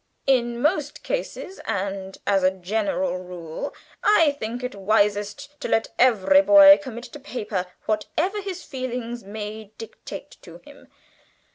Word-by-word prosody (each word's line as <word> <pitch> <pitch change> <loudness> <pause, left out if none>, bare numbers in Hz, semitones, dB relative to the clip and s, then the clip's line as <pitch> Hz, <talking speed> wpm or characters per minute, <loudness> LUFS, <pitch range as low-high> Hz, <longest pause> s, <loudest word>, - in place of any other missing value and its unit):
In 240 -3 +2
most 300 +1 0
cases, - - -4
and 195 -2 -3
as 195 -1 +3
a 185 - +5
general 200 +5 -1
rule, 180 - -6 0.3
I 335 -8 +5
think 235 +3 -4
it 250 - -3
wisest 210 +6 0
to - - -2
let 225 - +1
every 250 +2 +5
boy 295 0 +9
commit 240 -4 -7
to 295 - -10
paper 210 -9 -4 0.2
whatever 360 - -1
his 375 -2 -6
feelings 245 -3 -5
may 210 +2 -6
dictate 225 - -9
to - - -12
him. - - -16
235 Hz, 135 wpm, -24 LUFS, 200-285 Hz, 0.3 s, boy